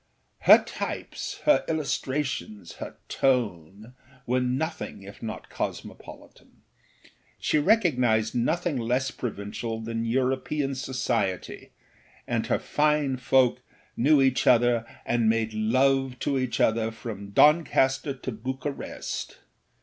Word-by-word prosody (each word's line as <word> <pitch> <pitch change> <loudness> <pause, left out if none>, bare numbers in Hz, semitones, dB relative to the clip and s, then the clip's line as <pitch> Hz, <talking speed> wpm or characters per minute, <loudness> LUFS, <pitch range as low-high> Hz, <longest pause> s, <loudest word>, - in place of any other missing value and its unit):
Her - - +7
types, - - -5
her 300 -1 +5
illustrations, 135 - -3
her - - -8
tone 105 -4 -1 0.3
were 125 +1 +1
nothing 130 -3 -3
if 100 +1 -12
not 110 - -6
cosmopolitan. - - -8 0.7
She 155 - +1
recognised 125 - +2
nothing 155 +6 0
less 125 +3 0
provincial 110 0 -5
than 115 0 -3
European 130 +3 0
society, 120 -8 -2 0.6
and - - -1
her - - +2
fine 150 -3 +1
folk 130 -1 +2 0.3
knew 140 +3 +4
each 130 -1 +1
other 120 -1 +4 0.2
and 120 -2 +2
made 110 -1 0
love 130 +4 +2
to 140 -2 0
each 130 -2 -2
other 110 0 +2
from 110 -3 -8
Doncaster 135 0 +3
to 130 0 -6
Bucharest. 130 +5 -5
125 Hz, 110 wpm, -26 LUFS, 115-135 Hz, 0.7 s, Her